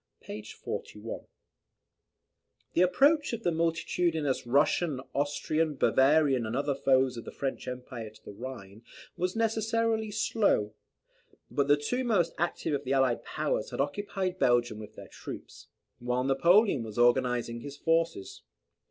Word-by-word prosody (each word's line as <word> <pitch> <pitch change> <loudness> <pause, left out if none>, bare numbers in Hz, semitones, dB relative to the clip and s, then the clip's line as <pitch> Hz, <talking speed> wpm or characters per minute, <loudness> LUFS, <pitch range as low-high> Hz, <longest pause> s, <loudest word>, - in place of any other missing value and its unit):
p. 105 - -7
41.] 105 +1 -7 1.5
The 170 - +3
approach 285 - +4
of 230 0 -4
the 175 - +2
multitudinous 165 -4 0
Russian, 145 +2 +2
Austrian, 150 +2 0
Bavarian, 135 -1 +3
and 110 - -3
other 140 +1 0
foes 130 -2 +2
of 115 - -6
the - - -7
French 135 -1 -4
Emperor 125 -3 -6
to 110 - -21
the - - -8
Rhine 105 -2 -9 0.3
was 180 +3 -2
necessarily 225 0 0
slow; 205 - +1 0.8
but 140 -1 +1
the 145 +1 +5
two 245 - -2
most 205 -9 +1
active 170 -2 -1
of 140 - -1
the 130 - -1
allied 135 -3 +2
powers - - -2
had - - -7
occupied 185 +5 -2
Belgium 120 -5 +2
with 105 - -10
their - - -10
troops, - - -10 0.3
while 125 +1 -1
Napoleon 170 - +4
was 110 -1 -7
organizing 120 -1 +2
his 140 +3 -8
forces. 165 - 0
145 Hz, 140 wpm, -29 LUFS, 125-180 Hz, 1.5 s, the